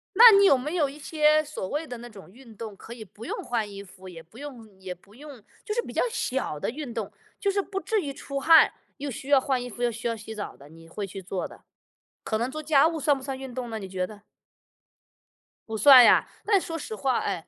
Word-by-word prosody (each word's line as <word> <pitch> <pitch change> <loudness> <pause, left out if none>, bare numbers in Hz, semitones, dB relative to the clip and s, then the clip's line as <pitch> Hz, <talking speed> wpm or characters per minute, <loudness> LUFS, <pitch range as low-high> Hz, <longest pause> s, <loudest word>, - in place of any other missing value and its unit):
那 465 +3 +10
你 400 - +6
有 280 - +7
没 300 +7 -4
有 310 -5 +2
一 275 +2 -10
些 305 0 +3
所 295 -11 -6
谓 305 +2 -3
的 245 - -7
那 240 +1 -10
种 195 -5 -14
运 235 -1 -16
动 215 -1 -8
可 235 - -10
以 230 -2 -9
不 210 +3 -13
用 - - -4
换 225 -3 -2
衣 200 0 -9
服， 190 -1 -15
也 170 -3 -10
不 175 +8 -19
用 235 -8 -11
也 190 -1 -6
不 195 +4 -22
用 280 -4 -12 0.2
就 425 - -2
是 475 - 0
比 - - -10
较 - - 0
小 265 - -2
的 - - -2
运 260 0 -6
动。 225 -4 -4 0.3
就 400 - 0
是 400 0 0
不 390 0 -5
至 440 -1 0
于 280 -4 -5
出 275 0 -5
汗， 320 +3 +6 0.3
又 285 0 -5
需 265 +2 -8
要 275 -2 +6
换 260 -2 0
衣 245 - -5
服 245 +1 -10
又 240 -1 +2
需 235 +2 -5
要 230 - -1
洗 220 0 -9
澡 205 - -6
的， 140 +1 -16
你 165 +1 -15
会 200 +5 -5
去 195 +1 -8
做 185 0 -4
的， - - -16 0.6
可 220 - -2
能 240 +3 -1
做 310 +3 -6
家 300 -1 +4
务 325 -1 -2
算 290 0 +3
不 265 - -9
算 270 -1 -4
运 265 -2 -8
动 245 -2 -5
呢？ 220 - -4
你 195 -3 -8
觉 185 -1 -2
得？ 205 0 -13 1.5
不 220 0 -3
算 265 0 +9
呀， - - +5 0.2
但 410 -2 +4
是 - - -8
说 330 0 -4
实 220 - -6
话 260 +2 0
哎。 170 +1 -4
245 Hz, 280 characters per minute, -26 LUFS, 210-295 Hz, 1.5 s, 那